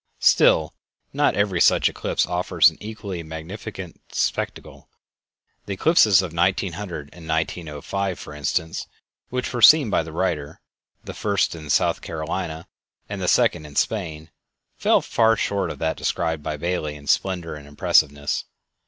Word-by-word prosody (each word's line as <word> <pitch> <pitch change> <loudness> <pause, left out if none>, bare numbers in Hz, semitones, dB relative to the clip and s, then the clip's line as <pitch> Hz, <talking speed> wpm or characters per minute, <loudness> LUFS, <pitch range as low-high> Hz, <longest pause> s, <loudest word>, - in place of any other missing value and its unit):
Still, 80 -1 +4 0.4
not - - +2
every 100 -4 +1
such - - +5
eclipse - - -1
offers 90 +1 +3
an - - -17
equally 105 -4 -6
magnificent 85 +3 -8
spectacle. - - -3 0.8
The 100 - -2
eclipses 105 - +5
of 85 -3 -6
1900 85 -3 -1
and 85 -2 -12
1905, 80 +3 -2
for 75 - -9
instance, 75 +3 -2 0.4
which 125 +1 -3
were 120 - -2
seen 145 -4 +7
by - - +3
the 80 0 -8
writer, 80 -4 -2 0.4
the - - -7
first 100 -2 0
in 80 -3 -9
South 70 - +2
Carolina 80 +1 -4 0.4
and - - -5
the - - -1
second 75 - +2
in 75 - -14
Spain, 80 -7 -2 0.4
fell - - +3
far 115 -1 +3
short 100 -3 -1
of - - -6
that 80 0 -1
described 80 -2 -1
by 75 0 -4
Bailey 80 -2 -2
in 70 -1 -12
splendor 85 +1 0
and 75 -1 -10
impressiveness. 75 0 +1
85 Hz, 145 wpm, -23 LUFS, 80-100 Hz, 0.8 s, seen